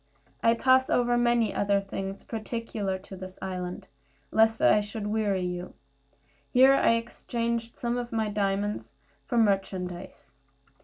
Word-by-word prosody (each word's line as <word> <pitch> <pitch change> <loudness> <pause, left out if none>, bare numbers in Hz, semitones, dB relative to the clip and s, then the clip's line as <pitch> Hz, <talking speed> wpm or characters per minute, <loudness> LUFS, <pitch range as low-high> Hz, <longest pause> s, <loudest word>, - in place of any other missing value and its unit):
I 230 0 +4
pass 260 +2 +4
over 245 0 +2
many 240 -2 +2
other 200 0 +2
things 195 0 -6
peculiar 220 -3 -3
to 190 +1 -11
this 185 0 -9
island, 180 -1 -5 0.4
lest 225 0 +4
I 210 - +5
should 205 +1 -6
weary 205 -3 0
you. 180 0 -5 0.7
Here 260 +2 +6
I 275 - +4
exchanged 230 0 -3
some 240 0 -1
of 240 -1 -5
my 220 -1 0
diamonds 200 - -1 0.3
for 240 - -1
merchandise. 190 - -1
210 Hz, 135 wpm, -28 LUFS, 195-235 Hz, 0.7 s, Here